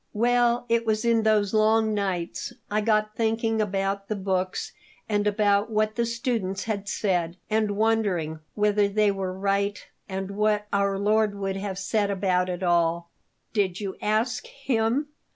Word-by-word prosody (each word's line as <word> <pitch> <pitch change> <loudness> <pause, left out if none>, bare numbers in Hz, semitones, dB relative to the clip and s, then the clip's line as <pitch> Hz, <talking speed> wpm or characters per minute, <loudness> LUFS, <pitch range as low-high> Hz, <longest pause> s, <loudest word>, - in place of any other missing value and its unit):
Well, 240 +2 +2
it 230 0 +2
was 220 0 0
in 230 -1 +3
those 215 -2 +2
long 220 0 +3
nights; 190 +1 -2 0.2
I 215 +1 +2
got 215 -1 +1
thinking 225 0 0
about 195 -1 -1
the 215 - -2
books 190 -1 -2 0.4
and 210 -1 +1
about 205 0 +2
what 215 0 +1
the 235 0 0
students 230 -5 -2
had 205 -2 -3
said 175 -4 -1
and 215 -2 +1
wondering 200 -8 +1 0.2
whether 210 -1 +3
they 210 0 +2
were 190 -2 -3
right 200 +2 0 0.3
and 190 0 -4
what 210 0 +1
Our 200 -1 +1
Lord 210 +1 +2
would 195 -1 -3
have 195 -1 -4
said 200 +1 0
about 185 -2 +1
it 180 +1 -4
all." 170 -1 +1 0.4
"Did 195 -4 0
you 195 -2 -4
ask 230 +4 0
Him?" 265 +1 -1
205 Hz, 155 wpm, -26 LUFS, 195-220 Hz, 0.4 s, in